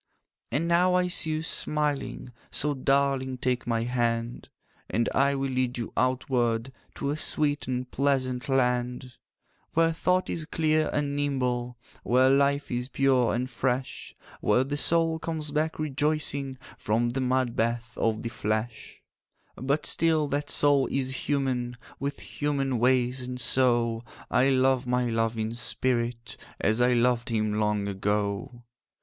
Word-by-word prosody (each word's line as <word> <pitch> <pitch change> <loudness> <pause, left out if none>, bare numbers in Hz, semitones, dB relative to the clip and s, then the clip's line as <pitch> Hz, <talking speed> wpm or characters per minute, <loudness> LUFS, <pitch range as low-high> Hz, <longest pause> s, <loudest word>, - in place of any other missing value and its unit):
'And 150 +7 0
now 180 +2 +3
I 180 0 +3
see 175 -2 +1
you 155 0 -1
smiling, 150 -5 -2 0.2
So, 150 0 0
darling, 135 -1 +1
take 125 -1 -1
my 115 -1 0
hand; 120 -1 -2 0.4
And 115 +1 0
I 140 +1 +3
will 135 0 -2
lead 130 -1 -1
you 115 - -5
outward 125 -1 0 0.2
To 140 - -2
a - - -1
sweet 150 -1 0
and 125 0 -3
pleasant 130 -3 0
land, 125 -1 0 0.6
'Where 165 0 +3
thought 180 +2 +1
is 160 - -3
clear 155 -1 +1
and 145 -1 -1
nimble, 125 -4 -1 0.2
Where 130 +2 +4
life 140 +1 +2
is 125 0 -2
pure 130 -4 +2
and 125 +2 -1
fresh, 130 +1 -3 0.2
Where 115 +5 +3
the 140 +2 -3
soul 165 +1 +2
comes 155 -2 -2
back 155 +2 -1
rejoicing 145 -2 -1 0.2
From 115 +3 +1
the 130 +3 -2
mud 130 -1 0
bath 115 0 -1
of 110 -1 0
the 115 - -3
flesh 110 +1 -4 0.5
'But 140 +4 -1
still 160 -2 +2
that 145 +1 -2
soul 145 -2 +3
is 130 -1 -2
human, 125 -4 -1 0.2
With 140 +1 -4
human 140 -4 -2
ways, 125 +1 +2
and 125 0 -5
so 120 -3 +3 0.3
I 130 +2 +4
love 130 -1 +2
my 125 -1 +1
love 115 0 0
in 110 +1 -2
spirit, 120 -1 -2 0.2
As 110 +2 +1
I 125 0 +4
loved 120 0 +2
him 110 -2 0
long 105 -1 0
ago. 100 +4 -2
130 Hz, 145 wpm, -27 LUFS, 120-140 Hz, 0.6 s, Where